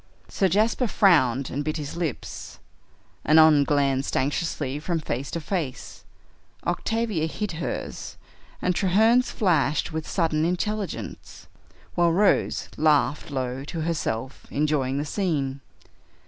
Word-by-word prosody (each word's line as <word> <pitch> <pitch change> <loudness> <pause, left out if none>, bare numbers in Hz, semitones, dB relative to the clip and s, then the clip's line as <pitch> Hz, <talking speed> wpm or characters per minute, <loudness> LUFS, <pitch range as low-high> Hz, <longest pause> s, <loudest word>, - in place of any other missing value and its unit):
Sir 195 - +1
Jasper 220 +6 +2
frowned 135 - +3
and 145 +3 -2
bit 155 +2 -2
his 145 -2 -5
lips, 170 -6 -5 0.7
Annon 155 -2 +6
glanced 140 -2 +1
anxiously 145 -1 -1
from 165 +2 -1
face 135 -3 -4
to 170 - -3
face, 160 -6 -4 0.6
Octavia 200 -1 -1
hid 210 +5 -4
hers, 165 0 -5 0.5
and 180 - +2
Treherne's 220 +7 +3
flashed 155 - +1
with 160 -1 -4
sudden 160 -4 +1
intelligence, 195 +4 -3 0.5
while 175 -1 +3
Rose 195 +4 +2
laughed 150 -2 +2
low 130 -1 -3
to 160 +2 -5
herself, 135 -6 -3
enjoying 140 -3 0
the 145 - -1
scene. 145 -7 -1
155 Hz, 120 wpm, -25 LUFS, 140-180 Hz, 0.7 s, Annon